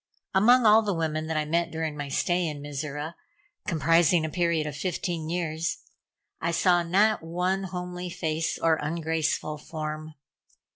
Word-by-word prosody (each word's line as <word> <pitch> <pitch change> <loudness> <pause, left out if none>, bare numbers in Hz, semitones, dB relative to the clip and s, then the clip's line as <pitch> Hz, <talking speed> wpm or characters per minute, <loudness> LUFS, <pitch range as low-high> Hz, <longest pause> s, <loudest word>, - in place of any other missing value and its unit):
Among 235 +5 +5
all 215 +1 +7
the 205 -4 -1
women 155 -1 -1
that 160 -1 -1
I 155 - 0
met 170 +2 0
during 160 -2 -3
my 145 -1 -5
stay 175 +4 +1
in 150 -2 -4
Mizora 145 +2 -5 0.5
comprising 165 0 +3
a 160 - -4
period 170 -3 +1
of 150 -2 -4
fifteen 170 -2 -3
years 165 -1 -2 0.6
I 170 - -1
saw 175 +1 +3
not 200 +6 +3
one 180 +4 -1
homely 180 0 -5
face 160 -1 -2
or 160 -1 +2
ungraceful 155 -1 -1
form. 155 0 -6
165 Hz, 150 wpm, -27 LUFS, 155-180 Hz, 0.6 s, all